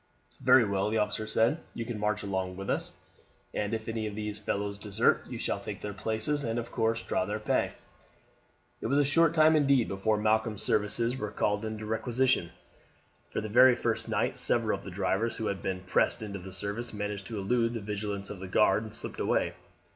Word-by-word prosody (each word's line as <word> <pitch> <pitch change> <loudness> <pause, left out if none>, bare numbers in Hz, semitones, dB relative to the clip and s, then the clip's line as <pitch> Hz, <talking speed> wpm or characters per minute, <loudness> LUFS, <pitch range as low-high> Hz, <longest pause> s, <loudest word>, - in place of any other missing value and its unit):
"Very 125 - +6
well," 100 0 0
the 110 - 0
officer 105 0 -1
said. 115 +8 +2 0.2
"You 115 - -3
can 115 -2 -4
march 105 +1 0
along 95 -2 -2
with 95 0 -3
us, - - -2 0.6
and 105 0 -1
if 110 -1 -3
any 110 -1 -2
of 105 - -6
these 105 0 -4
fellows 100 -1 -2
desert 100 -2 +1
you - - -5
shall - - -1
take - - -6
their 105 - -4
places, 110 +8 0
and 115 -1 -1
of 120 0 -4
course 115 0 0
draw - - 0
their 105 +3 -2
pay." 110 - 0 1.1
It - - -2
was 140 +4 +2
a 145 - +5
short 165 +3 +3
time 155 0 +6
indeed 140 -5 +4
before 105 +3 0
Malcolm's 110 0 +1
services 115 +4 +1
were 105 -4 -3
called 105 0 0
into 110 0 -5
requisition, 115 -2 +1 0.8
for - - -2
the 110 - -4
very 125 +3 +7
first 115 -2 -1
night 110 0 0
several 115 -3 +3
of - - -15
the - - -7
drivers, 100 +5 0
who 110 - -3
had 100 -2 -2
been 95 -1 -3
pressed 95 +4 +1
into 100 -2 -5
the 95 +1 -9
service, 105 +5 -2
managed 105 -2 -4
to 110 - -5
elude 115 +4 +1
the - - -2
vigilance 100 -1 -4
of 100 - -7
the 95 - -6
guard 105 +2 +3
and 110 0 -8
slipped 120 - -6
away. - - +1
110 Hz, 205 wpm, -29 LUFS, 100-115 Hz, 1.1 s, very